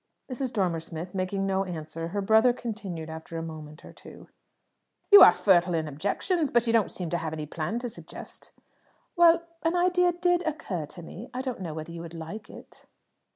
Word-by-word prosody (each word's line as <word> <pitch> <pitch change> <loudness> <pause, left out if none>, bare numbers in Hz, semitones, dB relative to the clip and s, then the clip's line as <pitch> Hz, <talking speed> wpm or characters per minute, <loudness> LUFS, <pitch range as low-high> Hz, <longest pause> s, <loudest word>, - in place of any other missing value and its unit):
Mrs. 255 0 -2
Dormer 180 -7 0
Smith 165 +2 -7
making 195 +1 -1
no 195 0 +1
answer, 165 -2 -5
her 200 +3 -3
brother 220 +4 +5
continued, 205 -9 -6
after 160 +1 -7
a 165 - -3
moment 155 -1 -9
or - - -12
two - - -14 0.8
"You 405 - +11
are - - +11
fertile 180 -3 +3
in 160 -1 -1
objections, 205 - -1
but 240 -1 +2
you 230 - +1
don't 225 -3 +3
seem 175 -3 -3
to 175 - +1
have 160 -1 -4
any 155 -1 -4
plan 160 +8 -3
to 245 +1 -3
suggest." - - -7 0.6
"Well, 340 -1 +6 0.2
an 330 +2 0
idea 360 0 +3
did 355 0 +2
occur 200 - -3
to 175 +3 -11
me. 215 +9 -9
I 255 - -2
don't 255 -6 -4
know 165 -4 -5
whether 155 +1 -6
you 170 0 -7
would 170 0 -9
like 185 +7 -8
it." - - -14
190 Hz, 200 wpm, -27 LUFS, 165-245 Hz, 0.8 s, You